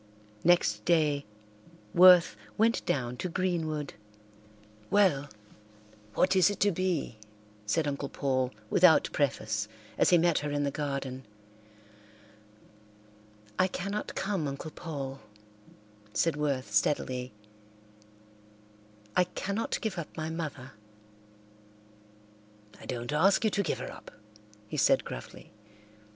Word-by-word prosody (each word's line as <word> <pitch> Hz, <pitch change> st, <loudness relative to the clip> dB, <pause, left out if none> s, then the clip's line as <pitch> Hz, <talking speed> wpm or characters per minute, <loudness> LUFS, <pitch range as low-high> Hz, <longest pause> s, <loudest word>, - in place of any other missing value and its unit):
Next 105 Hz, -12 st, +3 dB
day 150 Hz, -3 st, +2 dB, 0.7 s
Worth 180 Hz, -7 st, +7 dB, 0.2 s
went 225 Hz, +2 st, +2 dB
down 125 Hz, -2 st, -1 dB
to 180 Hz, -, -3 dB
Greenwood. 160 Hz, -5 st, -2 dB, 1.0 s
"Well, 180 Hz, -9 st, +3 dB, 0.9 s
what 190 Hz, -, +3 dB
is 185 Hz, +1 st, +5 dB
it 205 Hz, -, -4 dB
to 205 Hz, +1 st, +4 dB
be?" 170 Hz, -, -2 dB, 0.5 s
said 150 Hz, +8 st, +1 dB
Uncle 140 Hz, -1 st, -3 dB
Paul 130 Hz, -2 st, 0 dB, 0.2 s
without 175 Hz, -3 st, +5 dB
preface, 110 Hz, -7 st, -1 dB, 0.3 s
as -, -, +5 dB
he 175 Hz, -, +6 dB
met 170 Hz, -1 st, +3 dB
her 150 Hz, -, -3 dB
in 145 Hz, 0 st, -1 dB
the 140 Hz, -, 0 dB
garden. 135 Hz, -3 st, -4 dB, 2.4 s
"I 185 Hz, -, +5 dB
cannot 200 Hz, +3 st, -4 dB
come, 190 Hz, -6 st, -1 dB
Uncle 140 Hz, +3 st, -6 dB
Paul," 140 Hz, -6 st, -6 dB, 1.0 s
said 165 Hz, +8 st, +2 dB
Worth 140 Hz, -6 st, -2 dB
steadily. 125 Hz, +2 st, 0 dB, 1.8 s
"I 180 Hz, -, +4 dB
cannot 200 Hz, +4 st, -3 dB
give 215 Hz, -5 st, -3 dB
up 165 Hz, -, -8 dB
my 160 Hz, 0 st, -3 dB
mother." 145 Hz, -5 st, -5 dB, 2.1 s
"I -, -, -12 dB
don't 120 Hz, +3 st, -4 dB
ask 190 Hz, +9 st, +4 dB
you 220 Hz, -, +2 dB
to 200 Hz, -, +1 dB
give 200 Hz, -, -1 dB
her -, -, -6 dB
up," -, -, -12 dB, 0.6 s
he -, -, -5 dB
said -, -, +3 dB
gruffly. -, -, -9 dB
155 Hz, 115 wpm, -29 LUFS, 135-180 Hz, 2.4 s, Worth